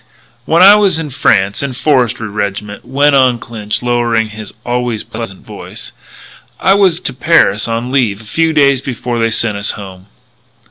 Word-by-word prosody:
"When 170 Hz, +3 st, +4 dB
I 200 Hz, +2 st, +9 dB
was 200 Hz, -5 st, +3 dB
in 155 Hz, -3 st, -5 dB
France 100 Hz, -6 st, +1 dB
in 140 Hz, -, -2 dB
a -, -, -7 dB
Forestry 125 Hz, -5 st, 0 dB
Rig'ment," 105 Hz, 0 st, -4 dB
went 140 Hz, +2 st, +2 dB
on 130 Hz, -3 st, +3 dB
Clinch, 110 Hz, -2 st, -5 dB
lowering 120 Hz, -2 st, 0 dB
his 110 Hz, 0 st, -9 dB
always 120 Hz, -2 st, -2 dB
pleasant 110 Hz, -4 st, -8 dB
voice, -, -, -8 dB, 0.7 s
"I 190 Hz, -, +3 dB
was 190 Hz, -4 st, +3 dB
to 135 Hz, -, -3 dB
Paris 125 Hz, -8 st, +2 dB
on 115 Hz, +2 st, -3 dB
leave 120 Hz, -7 st, +1 dB
a -, -, -13 dB
few 165 Hz, +8 st, 0 dB
days 140 Hz, -4 st, +3 dB
before 120 Hz, -2 st, -4 dB
they 115 Hz, 0 st, +1 dB
sent 110 Hz, -2 st, +1 dB
us 100 Hz, -, -1 dB
home. 95 Hz, -2 st, -11 dB
120 Hz, 175 wpm, -13 LUFS, 105-140 Hz, 0.7 s, I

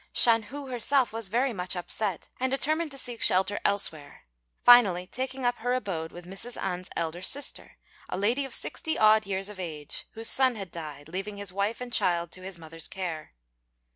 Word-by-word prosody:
Shan 230 Hz, -1 st, +6 dB
hu 280 Hz, +6 st, -8 dB
herself 255 Hz, 0 st, +2 dB
was 225 Hz, -3 st, -2 dB
very 245 Hz, +4 st, +1 dB
much 180 Hz, -2 st, -1 dB
upset, 190 Hz, +2 st, -3 dB
and 260 Hz, +1 st, +1 dB
determined 310 Hz, +4 st, 0 dB
to 275 Hz, -, -8 dB
seek 245 Hz, -3 st, -4 dB
shelter 190 Hz, +2 st, +3 dB
elsewhere, 160 Hz, -7 st, +1 dB, 0.4 s
finally 205 Hz, -8 st, +7 dB
taking 260 Hz, +4 st, -4 dB
up 245 Hz, 0 st, +1 dB
her 245 Hz, +2 st, -1 dB
abode 170 Hz, -10 st, -3 dB
with 175 Hz, 0 st, -11 dB
Mrs. 195 Hz, +6 st, -5 dB
An's 180 Hz, -1 st, -4 dB
elder 170 Hz, +1 st, -3 dB
sister, 280 Hz, +9 st, 0 dB, 0.4 s
a -, -, -3 dB
lady 230 Hz, +8 st, +1 dB
of 270 Hz, -, -4 dB
sixty 315 Hz, -, 0 dB
odd 215 Hz, -1 st, +5 dB
years 195 Hz, 0 st, -2 dB
of 210 Hz, -2 st, -9 dB
age, 155 Hz, -5 st, -5 dB
whose 225 Hz, 0 st, -3 dB
son 260 Hz, -2 st, +4 dB
had 195 Hz, -5 st, -7 dB
died, 150 Hz, -3 st, -8 dB
leaving 195 Hz, +4 st, -5 dB
his 200 Hz, -2 st, -2 dB
wife 200 Hz, +4 st, -1 dB
and 245 Hz, -1 st, -6 dB
child 170 Hz, -2 st, +1 dB
to 185 Hz, -, -5 dB
his 185 Hz, -1 st, -6 dB
mother's 165 Hz, 0 st, -5 dB
care. 170 Hz, -5 st, -5 dB
200 Hz, 190 wpm, -28 LUFS, 180-245 Hz, 0.4 s, finally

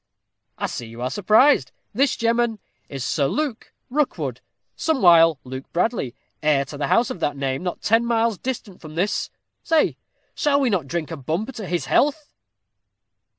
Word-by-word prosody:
I -, -, -2 dB
see 120 Hz, -, -5 dB
you 115 Hz, +1 st, -11 dB
are 130 Hz, -, -1 dB
surprised 215 Hz, -, +4 dB, 0.2 s
this, 270 Hz, +5 st, +2 dB
gemmen, 230 Hz, -1 st, +1 dB, 0.3 s
is 135 Hz, -3 st, -5 dB
Sir 140 Hz, -3 st, +1 dB
Luke 285 Hz, -, -3 dB, 0.2 s
Rookwood, 295 Hz, +1 st, -1 dB, 0.3 s
somewhile 170 Hz, -, +5 dB
Luke 130 Hz, +1 st, -8 dB
Bradley, 175 Hz, -, 0 dB, 0.3 s
heir 150 Hz, -2 st, +2 dB
to 145 Hz, +2 st, -9 dB
the 145 Hz, -, 0 dB
house 235 Hz, -, +3 dB
of -, -, -6 dB
that 145 Hz, -3 st, -1 dB
name, 135 Hz, -1 st, -2 dB
not 180 Hz, -1 st, -4 dB
ten 225 Hz, +2 st, +3 dB
miles 230 Hz, -3 st, +1 dB
distant 230 Hz, -7 st, -5 dB
from 155 Hz, -1 st, -10 dB
this. 190 Hz, +5 st, 0 dB, 0.3 s
Say, 325 Hz, -2 st, +2 dB, 0.4 s
shall 280 Hz, -1 st, +2 dB
we 265 Hz, -4 st, +2 dB
not 175 Hz, -8 st, 0 dB
drink 170 Hz, +2 st, -3 dB
a 165 Hz, -, -4 dB
bumper 165 Hz, -, -3 dB
to 220 Hz, -6 st, -7 dB
his 175 Hz, -1 st, -1 dB
health?" 295 Hz, +1 st, +1 dB
190 Hz, 165 wpm, -23 LUFS, 145-240 Hz, 0.4 s, somewhile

